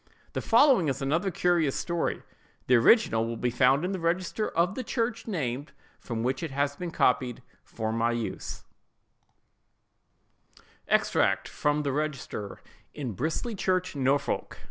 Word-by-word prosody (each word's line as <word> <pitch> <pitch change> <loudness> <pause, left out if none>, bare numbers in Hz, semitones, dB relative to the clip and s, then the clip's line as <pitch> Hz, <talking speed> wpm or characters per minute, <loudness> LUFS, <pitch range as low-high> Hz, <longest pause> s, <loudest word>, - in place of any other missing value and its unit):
The - - -2
following 235 - +5
is 135 -2 -1
another 160 +8 0
curious 170 -6 +1
story. 170 -1 -2 0.4
The 125 - +2
original 115 - +5
will 115 0 -4
be 125 +1 0
found 130 +6 +3
in 185 - -1
the 190 - -3
register 180 +5 -1
of 170 +3 +1
the 255 - -4
church 235 0 -2
named, 140 - -3 0.3
from 115 -2 -4
which 130 +2 -1
it 165 - -3
has 140 +1 -1
been 175 +3 -5
copied 125 -5 +1 0.2
for 110 -1 -4
my 115 +1 +1
use:— 120 -2 -4 2.2
EXTRACT - - +2
FROM 150 0 0
THE 140 - -1
REGISTER 140 -8 -4 0.3
IN 130 -7 -4
BRISLEY 160 - -2
CHURCH, 185 -4 -1
NORFOLK. 140 +1 0
145 Hz, 145 wpm, -28 LUFS, 125-180 Hz, 2.2 s, following